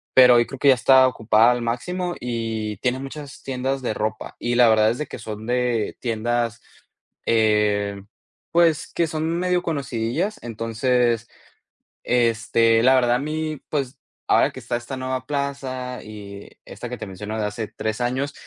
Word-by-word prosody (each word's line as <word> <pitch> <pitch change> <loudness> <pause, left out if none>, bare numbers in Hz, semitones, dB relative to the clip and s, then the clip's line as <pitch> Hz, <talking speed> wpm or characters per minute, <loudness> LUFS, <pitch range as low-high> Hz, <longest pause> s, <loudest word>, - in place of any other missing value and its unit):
pero 125 -1 +8
hoy 120 0 +4
creo 135 - -8
que 140 - +4
ya 135 - +9
está 130 +1 +6
ocupada 115 -1 +4
al 120 0 -1
máximo, 175 +10 -2
y 115 -3 -3
tiene 125 +1 0
muchas 140 +1 -8
tiendas 135 +1 -2
de 115 - -1
ropa. 110 +1 -4
Y 120 0 -1
la 120 -1 +6
verdad 110 -1 +4
es 120 - -4
de 150 - -2
que - - -8
son 110 0 -7
de 125 -3 0
tiendas, 120 0 -1 0.7
eh, 105 -2 +2 0.5
pues, 165 -3 +3
que 170 - +2
son 160 +1 -2
medio 180 0 +1
conocidillas, 140 - -2
entonces, 115 +1 0 0.8
este, 115 -1 +3
la 130 +2 +6
verdad 120 -2 +3
a - - 0
mí, 155 +1 -3
pues, 135 -3 -2 0.3
ahora - - +4
que - - -9
está - - -3
esta 120 +3 -7
nueva 130 -1 -3
plaza 135 -3 -3
y 100 -2 -10 0.2
esta - - -8
que - - -5
te - - -7
menciono 105 +3 -6
de 105 - 0
hace 105 +1 -4
3 110 +2 -4
años, 130 +4 -1
120 Hz, 170 wpm, -23 LUFS, 110-135 Hz, 0.8 s, ya